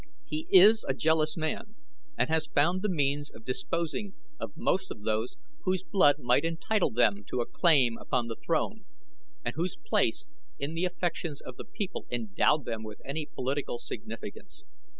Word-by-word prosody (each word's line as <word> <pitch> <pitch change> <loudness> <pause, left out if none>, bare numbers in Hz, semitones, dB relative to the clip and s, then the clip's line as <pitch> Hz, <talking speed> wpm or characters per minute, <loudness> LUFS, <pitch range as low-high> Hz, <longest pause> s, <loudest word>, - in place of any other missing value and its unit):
He 155 +1 -4
is 210 +4 +8
a 135 - +1
jealous 160 +2 +2
man 160 +7 -3 0.4
and - - +2
has 160 -1 +2
found 170 +6 +2
the 210 - 0
means 145 -3 0
of 110 - -15
disposing 170 +9 -2 0.2
of 115 -3 -6
most 190 +1 0
of 105 - -8
those 110 +2 -1 0.3
whose 185 -1 0
blood 145 -8 +4
might 125 +1 +2
entitle 165 +5 +1
them 105 -3 +2
to - - -3
a 120 - +1
claim 130 -10 +3
upon 125 -2 -1
the 115 -1 -4
throne, 200 - -1 0.6
and 120 - -1
whose 170 +4 -2
place 115 -4 0 0.3
in 140 +3 -3
the 165 +2 0
affections 175 -4 -2
of 125 - -9
the - - -8
people 205 -5 -5
endowed 120 +5 +1
them 115 -1 -3
with 110 -1 -8
any 150 +2 -3
political 135 -1 -2
significance. - - -8
150 Hz, 170 wpm, -29 LUFS, 125-175 Hz, 0.6 s, is